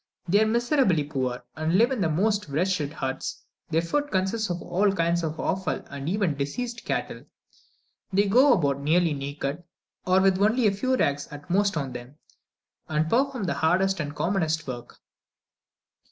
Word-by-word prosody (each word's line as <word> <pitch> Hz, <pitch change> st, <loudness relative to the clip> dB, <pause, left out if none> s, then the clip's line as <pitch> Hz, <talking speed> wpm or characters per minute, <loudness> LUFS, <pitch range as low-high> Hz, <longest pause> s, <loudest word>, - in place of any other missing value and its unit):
They 200 Hz, +5 st, +4 dB
are 220 Hz, -, +3 dB
miserably 235 Hz, -, +2 dB
poor, 130 Hz, -4 st, -3 dB
and 160 Hz, +3 st, +1 dB
live 235 Hz, +5 st, +4 dB
in 255 Hz, -6 st, -1 dB
the 165 Hz, -, +2 dB
most 205 Hz, +3 st, 0 dB
wretched 155 Hz, -1 st, 0 dB
huts; 135 Hz, -4 st, -4 dB, 0.3 s
their 165 Hz, +1 st, +1 dB
food 290 Hz, +12 st, -1 dB
consists 195 Hz, +2 st, 0 dB
of 175 Hz, 0 st, -2 dB
all 190 Hz, +4 st, +1 dB
kinds 170 Hz, -2 st, +1 dB
of 160 Hz, -1 st, -4 dB
offal 185 Hz, -6 st, -1 dB
and 140 Hz, +2 st, -4 dB
even 190 Hz, -5 st, 0 dB
diseased 235 Hz, -, -4 dB
cattle; -, -, -3 dB, 0.9 s
they 200 Hz, +2 st, +3 dB
go 255 Hz, +7 st, +6 dB
about 140 Hz, -, +1 dB
nearly 165 Hz, +2 st, +2 dB
naked, 140 Hz, +2 st, -4 dB, 0.5 s
or 185 Hz, +1 st, +5 dB
with 190 Hz, 0 st, +3 dB
only 220 Hz, +4 st, +3 dB
a 210 Hz, -, +5 dB
few 255 Hz, +7 st, 0 dB
rags 145 Hz, -, 0 dB
at 145 Hz, +3 st, -10 dB
most 200 Hz, -1 st, +2 dB
on 135 Hz, -4 st, -3 dB
them, 125 Hz, +3 st, -9 dB, 0.7 s
and 155 Hz, +1 st, 0 dB
perform 260 Hz, -1 st, +1 dB
the 175 Hz, -, 0 dB
hardest 185 Hz, +3 st, +1 dB
and 145 Hz, -1 st, -4 dB
commonest 160 Hz, -3 st, 0 dB
work. 120 Hz, -2 st, -7 dB
175 Hz, 170 wpm, -26 LUFS, 150-205 Hz, 0.9 s, go